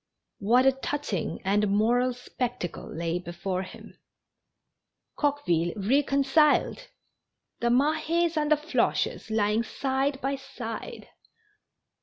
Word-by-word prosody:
What 240 +6 +4
a 270 - +7
touching 265 - -3
and 205 +2 +2
moral 235 +5 +2
spectacle 245 -6 -5
lay 170 +2 -2
before 180 +2 -4
him! 185 - -11 1.2
Coqueville 175 - 0
reconciled 275 - +3
I - - -13 0.7
The 235 - +1
Mahes 315 +6 +2
and 300 -1 0
the 305 - +6
Floches 300 -6 -1
lying 215 0 +2
side 270 +3 -1
by 275 +1 -1
side 265 -5 -7
250 Hz, 105 wpm, -27 LUFS, 205-285 Hz, 1.2 s, a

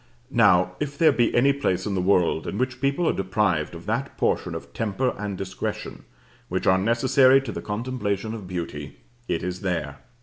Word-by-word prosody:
Now, 105 -8 +4
if 145 -1 -4
there 160 0 +5
be 120 -4 +2
any 135 +3 +4
place 95 -10 -1
in 105 - -2
the 95 - 0
world 90 -3 +2
in 100 - -3
which 130 +1 -2
people 140 +5 +1
are - - +3
deprived 95 -5 0
of - - -10
that - - -3
portion - - 0
of - - -8
temper 115 +4 -1
and 100 -1 -4
discretion 95 0 -5 0.4
which - - -2
are 95 0 +4
necessary 130 +5 +4
to 130 -4 -5
the - - -5
contemplation 110 -2 -3
of 105 -5 -7
beauty, 80 -5 -6 0.3
it 80 - -1
is 90 0 -4
there. 85 -7 -3
105 Hz, 190 wpm, -24 LUFS, 90-130 Hz, 0.4 s, there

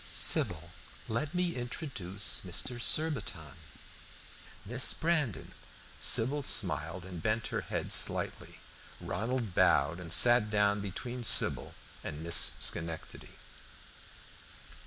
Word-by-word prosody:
"Sybil, 90 - +3 0.4
let 145 +9 -3
me 180 -1 -1
introduce 120 - -3
Mr. 120 +7 -3
Surbiton 105 - 0 1.1
Miss 120 +5 +3
Brandon." 155 - -2 0.5
Sybil 135 +6 +3
smiled 90 - 0
and 90 -3 -8
bent 110 +4 -1
her - - -1
head - - -4
slightly. - - -2 0.4
Ronald 115 -1 -4
bowed 70 +1 +2
and 85 -2 -7
sat 120 +3 +6
down 105 -1 +1
between 120 +5 -6
Sybil - - 0 0.3
and 75 +2 -7
Miss 85 -1 +3
Schenectady. 80 -1 -3
105 Hz, 100 wpm, -30 LUFS, 90-125 Hz, 1.1 s, sat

